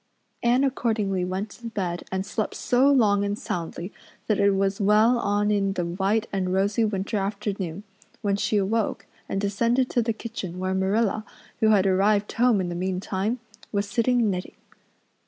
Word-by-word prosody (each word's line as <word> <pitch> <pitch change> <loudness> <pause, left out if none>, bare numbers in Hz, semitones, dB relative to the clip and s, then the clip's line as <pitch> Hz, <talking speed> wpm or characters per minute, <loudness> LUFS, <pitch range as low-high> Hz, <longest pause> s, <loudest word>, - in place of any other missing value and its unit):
Anne 245 +3 +3
accordingly 220 -8 0
went 190 +3 -3
to 235 - -9
bed 185 -6 -3
and 190 0 -2
slept 215 +1 -3
so 255 +3 +3
long 205 -7 +4
and 205 0 -1
soundly 170 +1 -5 0.3
that 215 - +1
it 200 0 +4
was 195 +1 0
well 215 +4 +4
on 205 -1 +1
in 195 -1 +1
the 175 -2 -2
white 195 +5 0
and 185 -2 -1
rosy 200 +4 +2
winter 205 0 -1
afternoon 195 -2 -3 0.4
when 200 -1 +2
she 210 +1 0
awoke 205 +2 0 0.2
and 195 - -1
descended 235 +6 +1
to 240 - +2
the 230 0 0
kitchen 215 -6 -6
where 185 +1 -1
Marilla, 200 +3 +1 0.4
who 220 - +4
had 200 -3 +4
arrived 200 +2 +2
home 240 -2 +3
in 180 -2 -1
the - - -3
meantime, 190 +5 -2 0.3
was 200 -1 -1
sitting 235 +2 +2
knitting. 180 0 -5
200 Hz, 170 wpm, -25 LUFS, 190-220 Hz, 0.4 s, long